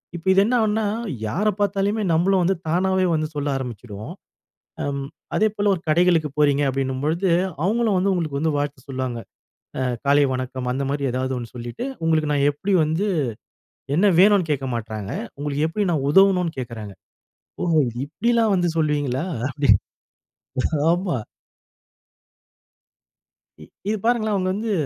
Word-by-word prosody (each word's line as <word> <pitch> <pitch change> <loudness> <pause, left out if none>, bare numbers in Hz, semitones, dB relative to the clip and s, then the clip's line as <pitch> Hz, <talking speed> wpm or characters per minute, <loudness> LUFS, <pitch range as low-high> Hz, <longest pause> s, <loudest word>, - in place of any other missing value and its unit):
இப்ப 170 - -8
இது 195 - +5
என்ன 250 - +1
ஆவுன்னா 220 0 +1 0.4
யாரை 205 - +1
பார்த்தாலுமே, 200 +1 0
நம்மளும் 185 +3 +3
வந்து 190 +3 +2
தானாவே 185 +3 +2
வந்து 155 0 0
சொல்ல 145 0 -2
ஆரம்பிச்சுடுவோம். 115 -4 -7 0.7
அம். 140 -1 -2 0.3
அதே 220 - +4
போல 205 0 +2
ஒரு 170 - -9
கடைகளுக்கு 165 -1 +3
போறீங்க 145 -1 +3
அப்படினும்போது, 135 +7 -1 0.4
அவங்களும் 220 0 +2
வந்து 195 +2 +2
உங்களுக்கு 155 -6 -2
வந்து 160 0 0
வாழ்த்து 145 -2 -4
சொல்வாங்க. 130 -3 -3 0.6
ஆ - - -1 0.2
காலை 145 +1 +5
வணக்கம் 130 0 -3
அந்த 135 +2 -2
மாதிரி 140 0 -2
ஏதாவது 130 +1 -2
ஒண்ணு 120 -1 -7
சொல்லிட்டு, 120 - -5 0.2
உங்களுக்கு 155 -2 +2
நான் 140 0 +3
எப்படி 195 +8 -2
வந்து 160 +6 0 0.9
என்ன 200 +5 +4
வேனும்னு 200 -4 +5
கேட்க 135 -2 -2
மாட்டாங்க, 110 -3 -5 0.3
உங்களுக்கு 145 +1 -1
எப்படி 205 +6 -1
நான் 140 -3 0
உதவனும்னு 180 -2 +4
கேட்கிறாங்க, 115 -5 -6 0.7
ஓ - - 0 0.4
இப்படில்லாம் 225 +7 +1
வந்து 175 -1 +1
சொல்வீங்களா? 145 -2 0 0.2
அப்படி, 140 0 -1 1.2
ஆமா. 175 -3 0 2.5
இ - - -11 0.2
இது 215 - +1
பாருங்களேன், 225 -3 +2
அவங்க 185 -1 0
வந்து 215 +3 -2
155 Hz, 140 wpm, -22 LUFS, 135-195 Hz, 2.5 s, இது